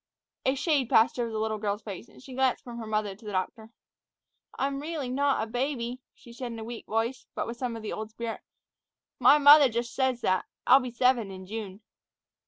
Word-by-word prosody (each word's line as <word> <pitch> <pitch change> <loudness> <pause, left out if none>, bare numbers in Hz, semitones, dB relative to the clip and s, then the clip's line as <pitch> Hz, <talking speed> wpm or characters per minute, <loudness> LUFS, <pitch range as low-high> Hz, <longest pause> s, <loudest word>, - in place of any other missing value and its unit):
A 265 - +3
shade 280 -3 +1
passed 225 +3 +4
over 235 -1 0
the 220 - -4
little 215 0 -1
girl's 205 0 -2
face, 205 +3 -8
and - - -17
she 265 - -10
glanced 260 0 +1
from 240 -1 -8
her 225 - -6
mother 215 -2 -1
to 215 - -20
the 210 - -6
doctor. 210 +4 -3 0.9
"I'm 275 0 -1
really 300 -4 -4
not 275 -2 +1
a - - -2
baby," 245 +1 -3
she 235 - -15
said 245 0 -5
in - - -7
a 220 - -6
weak 235 +1 -8
voice, 230 +3 -2
but - - -1
with 235 +1 -6
something 240 -2 -3
of 225 - -9
the 215 - -4
old 215 0 -5
spirit; 225 +1 -5 0.8
"my 295 - +7
mother 290 -1 +8
jus' 235 0 -3
says 260 -2 0
that. 185 -5 +1 0.2
I'll 260 +2 +7
be 255 -2 -4
seven 245 -3 +2
in 190 -1 -9
June." 205 -1 -6
235 Hz, 215 wpm, -28 LUFS, 220-260 Hz, 0.9 s, mother